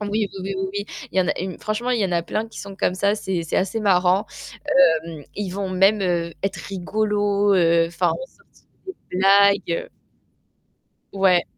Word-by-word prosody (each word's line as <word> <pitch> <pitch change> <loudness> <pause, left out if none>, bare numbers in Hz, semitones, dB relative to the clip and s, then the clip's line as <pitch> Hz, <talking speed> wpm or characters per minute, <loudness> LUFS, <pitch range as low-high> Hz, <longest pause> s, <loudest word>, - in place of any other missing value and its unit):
oui, 210 - -3 0.3
oui, - - -7
oui, 195 +1 -3
oui, 190 0 -2
oui, 205 0 -3 0.3
il 190 - 0
y - - +6
en 180 - 0
a - - -1
une 185 0 -4
franchement, 220 +4 -2
il 240 - +1
y - - +2
en 190 - -1
a 170 - +1
plein 220 +6 -3
qui - - -12
sont 200 -1 -9
comme 180 - 0
ça. 200 +2 +1
C'est 190 -4 -3
c'est 160 - -2
assez 195 +4 0
marrant. 190 0 +3 0.8
Hem, 155 -4 -9
Ils 205 -3 -3
vont 195 +1 -3
même, 195 +3 +3
heu, 170 -2 -1
être 195 - -1
rigolos, 205 +1 0
heu, 170 -2 +4
enfin, 170 - 0
même - - -6
sortir 470 -1 -28 0.2
des 375 -2 -7 0.2
blagues, 200 +1 +5
heu 170 - -2 1.3
Ouais. 190 -3 +3
195 Hz, 200 wpm, -22 LUFS, 180-205 Hz, 1.3 s, y